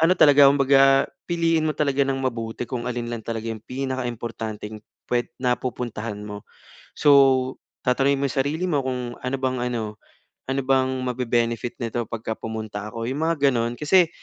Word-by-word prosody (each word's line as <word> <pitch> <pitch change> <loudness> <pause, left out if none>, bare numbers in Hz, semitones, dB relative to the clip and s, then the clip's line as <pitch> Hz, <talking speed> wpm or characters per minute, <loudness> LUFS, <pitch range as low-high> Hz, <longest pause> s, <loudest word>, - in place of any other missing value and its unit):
ano 165 +3 +5
talaga 145 -1 +7
kumbaga 135 0 +5 0.2
piliin 165 -2 +2
mo 155 - -1
talaga 140 -2 +1
ng 135 - 0
mabuti 115 -2 -3
kung 125 -2 -3
alin 120 -1 -3
lang 115 - -4
talaga 115 0 -4
yung 110 - -8
pinaka 130 0 -3
importanteng 110 -2 -6 0.3
pwe 120 0 +1
na 125 -1 0
pupuntahan 115 -3 -4
mo. 105 -1 -8 0.5
So 135 -3 +4 0.3
tatanungin 135 +2 +2
mo 140 - 0
yung - - -7
sarili 155 +6 -2
mo 145 -4 +1
kung, 125 -2 -3
"Ano 130 +2 -1
bang 130 -1 0
ano 110 -3 -4 0.5
ano 135 +1 0
bang 130 0 +2
mabe-benefit 120 -1 -1
nito 115 0 -2
pagka 115 -1 -4
pumunta 110 -2 -5
ako?" 115 +1 -5
Yung 135 - -3
mga 145 -4 +3
ganun 120 -1 -1
kasi 165 +5 +4
125 Hz, 170 wpm, -24 LUFS, 115-135 Hz, 0.5 s, talaga